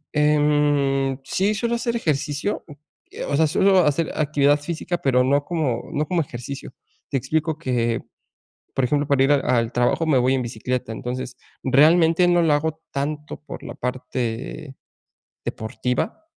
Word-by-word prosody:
Em, 145 Hz, -2 st, +2 dB
sí, 200 Hz, +9 st, 0 dB
suelo 235 Hz, +2 st, -1 dB
hacer 235 Hz, 0 st, -1 dB
ejercicio, 150 Hz, -1 st, -1 dB
uh, 145 Hz, -, -11 dB, 0.3 s
eh, -, -, -7 dB
o -, -, -1 dB
sea, 160 Hz, +2 st, +4 dB
suelo 190 Hz, +5 st, +4 dB
hacer 160 Hz, 0 st, +2 dB
actividad 145 Hz, -1 st, +2 dB
física, 170 Hz, +3 st, -3 dB
pero 125 Hz, -2 st, +3 dB
no 140 Hz, +2 st, +2 dB
como 145 Hz, -9 st, -2 dB
no 150 Hz, +1 st, 0 dB
como 175 Hz, +1 st, 0 dB
ejercicio. 130 Hz, -1 st, -7 dB, 0.4 s
Te 135 Hz, -, 0 dB
explico 155 Hz, +4 st, -1 dB
que, 120 Hz, -6 st, 0 dB, 0.8 s
por 135 Hz, -, +1 dB
ejemplo, 145 Hz, +3 st, +1 dB
para 140 Hz, -2 st, +3 dB
ir 145 Hz, -, +4 dB
al 140 Hz, -, +3 dB
al 115 Hz, -1 st, +1 dB
trabajo 125 Hz, +7 st, +1 dB
me 150 Hz, -5 st, +3 dB
voy 130 Hz, +2 st, +3 dB
en 130 Hz, -, 0 dB
bicicleta, 125 Hz, -1 st, -3 dB
entonces, 125 Hz, +1 st, -5 dB, 0.2 s
realmente 160 Hz, +6 st, +5 dB
no 175 Hz, -1 st, +4 dB
lo 160 Hz, -, +3 dB
hago 160 Hz, +2 st, -1 dB
tanto 150 Hz, +2 st, -4 dB
por 150 Hz, -, -9 dB
la -, -, -7 dB
parte 125 Hz, +2 st, -4 dB, 0.7 s
deportiva, 125 Hz, -, -3 dB
145 Hz, 155 wpm, -23 LUFS, 130-160 Hz, 0.8 s, realmente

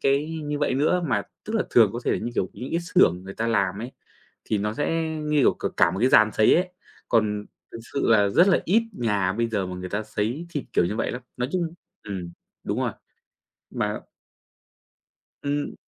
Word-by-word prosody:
cái 140 Hz, +2 st, +2 dB, 0.2 s
như 145 Hz, 0 st, -2 dB
vậy 145 Hz, -, +1 dB
nữa, 155 Hz, +6 st, +2 dB
mà 110 Hz, -8 st, +1 dB, 0.2 s
tức 215 Hz, -, -5 dB
là 225 Hz, -, +2 dB
thường 110 Hz, -4 st, +6 dB
có 120 Hz, -, -3 dB
thể -, -, +1 dB
là -, -, 0 dB
như 115 Hz, -, -4 dB
kiểu -, -, -1 dB
những 130 Hz, -, -7 dB
cái 170 Hz, -, 0 dB
xưởng 90 Hz, -, +3 dB
người 95 Hz, 0 st, -8 dB
ta 115 Hz, -, -2 dB
làm 100 Hz, -4 st, +1 dB
ấy, 125 Hz, -, -7 dB, 0.5 s
thì 105 Hz, -, 0 dB
nó 105 Hz, +1 st, -1 dB
sẽ 145 Hz, -, -1 dB, 0.3 s
như 150 Hz, 0 st, +1 dB
kiểu -, -, +4 dB
c -, -, -4 dB
cả 90 Hz, -, +5 dB
một 95 Hz, -, -4 dB
cái 125 Hz, -, +4 dB
dàn 110 Hz, -3 st, +6 dB
sấy 110 Hz, -, +5 dB
ấy. 180 Hz, +2 st, +2 dB, 0.4 s
Còn 105 Hz, -2 st, +1 dB, 0.3 s
thực -, -, -7 dB
sự 140 Hz, -, 0 dB
là 105 Hz, -3 st, +5 dB
rất 175 Hz, -, +5 dB
là 190 Hz, -, +4 dB
ít 215 Hz, +7 st, +3 dB
nhà 105 Hz, -, 0 dB
bây 115 Hz, +3 st, 0 dB
giờ 105 Hz, -4 st, -1 dB
mà 90 Hz, -, -5 dB
người 90 Hz, 0 st, -6 dB
ta 105 Hz, +3 st, -2 dB
sấy 110 Hz, +9 st, -3 dB
thịt 145 Hz, -5 st, -3 dB
kiểu -, -, +3 dB
như 105 Hz, +5 st, -2 dB
vậy -, -, -1 dB
lắm. 125 Hz, +1 st, -6 dB
Nói 125 Hz, +1 st, -1 dB
chung 170 Hz, -2 st, -1 dB, 0.3 s
ừm, 95 Hz, -4 st, -5 dB, 0.3 s
đúng -, -, -1 dB
rồi. -, -, 0 dB, 0.8 s
Mà -, -, -2 dB, 1.4 s
Ừm. 145 Hz, 0 st, -2 dB
115 Hz, 220 wpm, -25 LUFS, 105-145 Hz, 1.4 s, thường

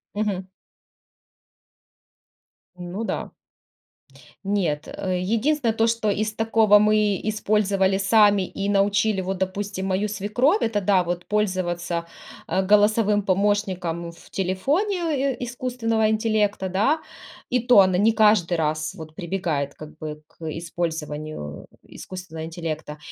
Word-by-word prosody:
Мгм. 200 Hz, -3 st, -2 dB, 2.3 s
Ну 180 Hz, +4 st, -5 dB
да. -, -, -3 dB, 1.1 s
Нет, 180 Hz, -7 st, -1 dB
э, 185 Hz, -2 st, -3 dB
единственное 230 Hz, +5 st, +1 dB
то, 225 Hz, +1 st, +2 dB
что 230 Hz, -2 st, 0 dB
из 215 Hz, +2 st, -1 dB
такого 220 Hz, -1 st, +4 dB
мы 210 Hz, -2 st, +3 dB
использовали 200 Hz, -2 st, +1 dB
сами 200 Hz, 0 st, +4 dB
и 200 Hz, +1 st, -3 dB
научили 200 Hz, 0 st, +2 dB
вот, 190 Hz, 0 st, -3 dB
допустим, 190 Hz, 0 st, -3 dB
мою 190 Hz, +2 st, 0 dB
свекровь, 215 Hz, -, +1 dB
это 225 Hz, -2 st, +1 dB
да, 195 Hz, -2 st, +3 dB
вот 175 Hz, 0 st, -3 dB
пользоваться, 175 Hz, -5 st, -1 dB, 0.4 s
а, 190 Hz, -, +1 dB
голосовым 210 Hz, +1 st, +3 dB
помощником 185 Hz, -4 st, 0 dB
в 170 Hz, -, -18 dB
телефоне, 290 Hz, -, 0 dB, 0.3 s
э, -, -, -10 dB
искусственного 235 Hz, -3 st, -1 dB
интеллекта, 215 Hz, -3 st, 0 dB
да. 220 Hz, -, +2 dB, 0.5 s
И 250 Hz, -, +2 dB
то 245 Hz, -4 st, +7 dB
она 185 Hz, -1 st, +3 dB
не 215 Hz, +4 st, +4 dB
каждый 210 Hz, -6 st, +4 dB
раз 155 Hz, +1 st, -1 dB
вот 160 Hz, -4 st, -11 dB
прибегает 170 Hz, -6 st, -2 dB
как 155 Hz, 0 st, -11 dB
бы 150 Hz, -1 st, -7 dB
к -, -, -31 dB, 0.2 s
использованию 155 Hz, -, -5 dB, 0.2 s
искусственного 180 Hz, -4 st, -8 dB
интеллекта. 160 Hz, -2 st, -5 dB
195 Hz, 120 wpm, -23 LUFS, 175-215 Hz, 2.3 s, то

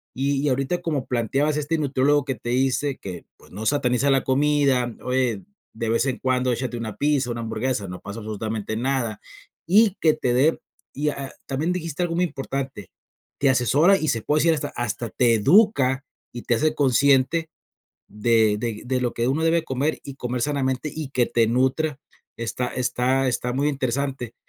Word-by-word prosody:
Y 135 Hz, +1 st, 0 dB
y 145 Hz, -, +1 dB
ahorita, 135 Hz, +7 st, -1 dB
como 150 Hz, -6 st, -2 dB
planteabas 135 Hz, +5 st, 0 dB
este 150 Hz, +2 st, -1 dB
nutriólogo 145 Hz, -1 st, +2 dB
que 135 Hz, -, -1 dB
te 120 Hz, +1 st, -7 dB
dice 130 Hz, +2 st, +1 dB
que, 90 Hz, -3 st, -8 dB
pues, -, -, -20 dB
no 105 Hz, +4 st, -6 dB
sataniza 135 Hz, -1 st, +1 dB
la 135 Hz, -1 st, +3 dB
comida: 135 Hz, -2 st, +2 dB
"Oye, 125 Hz, -4 st, 0 dB, 0.3 s
de 115 Hz, 0 st, -3 dB
vez 115 Hz, +2 st, +2 dB
en 130 Hz, -1 st, -1 dB
cuando 130 Hz, -1 st, +1 dB
échate 120 Hz, 0 st, -3 dB
una 110 Hz, -2 st, -5 dB
pizza, 145 Hz, -3 st, +1 dB
una 120 Hz, 0 st, -4 dB
hamburguesa, 110 Hz, -1 st, -2 dB
no 90 Hz, 0 st, -7 dB
pasa 100 Hz, +3 st, -7 dB
absolutamente 110 Hz, 0 st, -4 dB
nada", 120 Hz, -4 st, -1 dB, 0.5 s
y 205 Hz, +2 st, +5 dB
que 155 Hz, -2 st, +5 dB
te 125 Hz, -5 st, 0 dB
de, 140 Hz, +6 st, +3 dB, 0.3 s
y, 150 Hz, +2 st, 0 dB
ah -, -, -4 dB
ah, -, -, -12 dB
también 145 Hz, +6 st, -1 dB
dijiste 165 Hz, -2 st, -4 dB
algo 170 Hz, -1 st, -1 dB
muy 175 Hz, -, +2 dB
importante, 135 Hz, -, -5 dB, 0.5 s
te 140 Hz, -, +3 dB
asesora 140 Hz, -, +4 dB
y 155 Hz, -, -2 dB
se 115 Hz, -, 0 dB
puede 150 Hz, +1 st, +1 dB
decir 165 Hz, -1 st, +4 dB
hasta 150 Hz, -, -3 dB
hasta 120 Hz, -1 st, -3 dB
te 120 Hz, -3 st, +3 dB
educa 135 Hz, -, +4 dB, 0.3 s
y 120 Hz, -, -6 dB
te 120 Hz, -, +1 dB
hace 155 Hz, +5 st, +1 dB
consciente 140 Hz, +3 st, +3 dB, 0.6 s
de 110 Hz, -1 st, +2 dB
de 110 Hz, -1 st, -4 dB
de 130 Hz, 0 st, 0 dB
lo 125 Hz, -1 st, -1 dB
que 120 Hz, +1 st, 0 dB
uno 145 Hz, +5 st, 0 dB
debe 165 Hz, 0 st, +2 dB
comer, 140 Hz, +2 st, -1 dB
y 140 Hz, -, -7 dB
comer 125 Hz, -1 st, -3 dB
sanamente, 135 Hz, 0 st, -1 dB
y 155 Hz, -3 st, -5 dB
que 125 Hz, -3 st, +2 dB
te 115 Hz, -1 st, +2 dB
nutra, 130 Hz, +5 st, +1 dB, 0.4 s
está 115 Hz, +2 st, -3 dB
está 130 Hz, +1 st, +1 dB
está 125 Hz, 0 st, -1 dB
muy 140 Hz, +3 st, +1 dB
interesante. 135 Hz, -3 st, -2 dB
130 Hz, 185 wpm, -23 LUFS, 120-145 Hz, 0.6 s, y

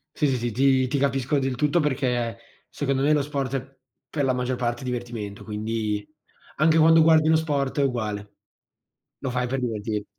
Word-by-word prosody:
Sì, 150 Hz, -, +2 dB
sì, 130 Hz, -2 st, +1 dB
sì 120 Hz, 0 st, -2 dB
ti 130 Hz, +2 st, +3 dB
ti 140 Hz, +3 st, -1 dB
capisco 135 Hz, +1 st, +1 dB
del 130 Hz, -1 st, -1 dB
tutto 150 Hz, +6 st, +2 dB
perché 125 Hz, -6 st, 0 dB, 0.3 s
secondo 140 Hz, -2 st, -1 dB
me 150 Hz, +2 st, +4 dB
lo 150 Hz, -, +3 dB
sport 140 Hz, -2 st, -3 dB
è 135 Hz, +1 st, -6 dB, 0.3 s
per 145 Hz, -, -1 dB
la 130 Hz, -, +2 dB
maggior 125 Hz, 0 st, -1 dB
parte 120 Hz, +1 st, -2 dB
divertimento, 120 Hz, -5 st, -5 dB
quindi 105 Hz, -1 st, -3 dB, 0.5 s
anche 155 Hz, +2 st, +3 dB
quando 160 Hz, +1 st, +6 dB
guardi 160 Hz, -1 st, +5 dB
lo 160 Hz, -, +5 dB
sport 145 Hz, -3 st, 0 dB
è -, -, +4 dB
uguale. 105 Hz, -6 st, -3 dB, 0.9 s
Lo 130 Hz, -, -3 dB
fai 125 Hz, 0 st, -1 dB
per 135 Hz, +2 st, -2 dB
divertir 110 Hz, -3 st, -3 dB
130 Hz, 185 wpm, -25 LUFS, 120-145 Hz, 0.9 s, quando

